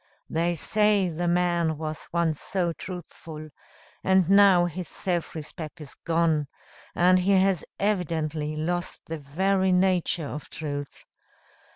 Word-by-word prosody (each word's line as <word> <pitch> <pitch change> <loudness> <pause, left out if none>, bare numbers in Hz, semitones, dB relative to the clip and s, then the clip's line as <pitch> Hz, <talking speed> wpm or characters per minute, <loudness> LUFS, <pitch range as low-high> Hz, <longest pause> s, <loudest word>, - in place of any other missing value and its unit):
They 170 +2 +1
say 210 +2 +2
the 175 +2 -2
man 170 -2 +1
was 155 0 -5
once 165 -3 0
so 180 -3 -1
truthful, 160 -3 -8 0.5
and 190 -2 +4
now 195 -3 +6
his 175 +1 -5
self 175 -3 -3
respect 155 +1 -7
is 150 -3 -10
gone; 165 -3 +1 0.5
and 180 +1 +5
he 190 +2 +2
has 190 -2 +3 0.2
evidently 160 -6 -1
lost 175 +3 -2
the 165 -1 -5
very 190 +7 +1
nature 180 -3 +2
of 150 +1 -7
truth. 145 -2 -6
170 Hz, 130 wpm, -26 LUFS, 155-185 Hz, 0.5 s, now